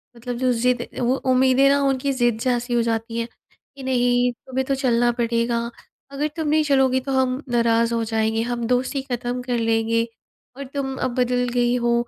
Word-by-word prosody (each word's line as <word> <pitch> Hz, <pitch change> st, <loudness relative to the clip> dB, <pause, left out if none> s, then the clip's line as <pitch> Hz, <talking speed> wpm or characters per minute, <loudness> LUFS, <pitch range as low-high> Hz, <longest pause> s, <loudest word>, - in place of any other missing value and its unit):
मतलब 240 Hz, +1 st, -5 dB
जो 255 Hz, 0 st, +1 dB
ज़िद 245 Hz, +1 st, 0 dB
वो 250 Hz, +1 st, +2 dB, 0.2 s
उम्मीदें 260 Hz, +1 st, +4 dB
ना 280 Hz, 0 st, +3 dB
उनकी 270 Hz, +1 st, 0 dB
ज़िद 240 Hz, -4 st, +1 dB
जैसी 245 Hz, 0 st, -1 dB
हो 240 Hz, -, +3 dB
जाती 230 Hz, 0 st, -2 dB
है। 230 Hz, -, -1 dB, 0.5 s
कि 275 Hz, -, -10 dB
नहीं 245 Hz, -1 st, +2 dB
तुम्हें 260 Hz, +2 st, -4 dB
तो 275 Hz, -, +1 dB
चलना 240 Hz, -3 st, +2 dB
पड़ेगा, 235 Hz, 0 st, +1 dB, 0.5 s
अगर 280 Hz, +2 st, -1 dB
तुम 320 Hz, -2 st, -2 dB
नहीं 310 Hz, +1 st, +3 dB
चलोगी 265 Hz, -3 st, +3 dB
तो 270 Hz, +1 st, -5 dB
हम 260 Hz, +1 st, +1 dB
नाराज़ 230 Hz, -1 st, +2 dB
हो 230 Hz, 0 st, 0 dB
जाएँगे। 220 Hz, 0 st, 0 dB
हम 235 Hz, 0 st, -2 dB
दोस्ती 255 Hz, +3 st, 0 dB
ख़त्म 245 Hz, +1 st, -2 dB
कर 245 Hz, -1 st, -2 dB
लेंगे 225 Hz, 0 st, +1 dB, 0.5 s
और 280 Hz, -, -5 dB
तुम 270 Hz, -2 st, -3 dB
अब 255 Hz, -, -2 dB
बदल 250 Hz, 0 st, +1 dB
गई 245 Hz, 0 st, +2 dB
हो। 240 Hz, -, +3 dB
245 Hz, 190 wpm, -22 LUFS, 235-260 Hz, 0.5 s, उम्मीदें